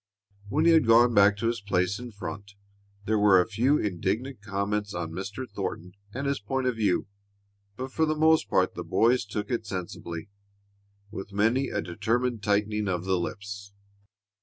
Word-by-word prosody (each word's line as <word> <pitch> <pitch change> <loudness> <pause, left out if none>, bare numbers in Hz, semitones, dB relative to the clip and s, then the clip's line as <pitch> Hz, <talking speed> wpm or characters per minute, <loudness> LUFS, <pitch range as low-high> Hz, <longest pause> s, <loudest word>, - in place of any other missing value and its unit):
When 155 +8 +1
he 170 - +7
had 160 -7 +4
gone 120 +1 +6
back 100 -1 +5
to 105 - -3
his 115 -1 -1
place 100 0 0
in 125 -1 -8
front 100 0 -8 0.5
there 110 0 +1
were 100 -3 +6
a 90 - +3
few 125 +7 +2
indignant 105 - -2
comments 100 0 -2
on 85 -2 -3
Mr. 100 +9 -5
Thornton 95 -3 -5 0.2
and 140 +6 -4
his 140 0 0
point 130 +5 -2
of 125 -2 +1
view, 105 -5 +1 0.7
but 130 +4 -6
for 160 +2 +1
the 155 - +1
most 160 +1 +4
part - - +2
the - - -5
boys 120 0 +2
took 105 +1 -4
it 115 -3 -2
sensibly, 85 -2 -5 0.8
with 100 -1 -7
many 115 +7 +2
a - - -2
determined 115 +6 -1
tightening 105 +1 0
of 90 -1 -2
the 95 -1 +1
lips. 100 +2 -6
105 Hz, 175 wpm, -27 LUFS, 100-125 Hz, 0.8 s, he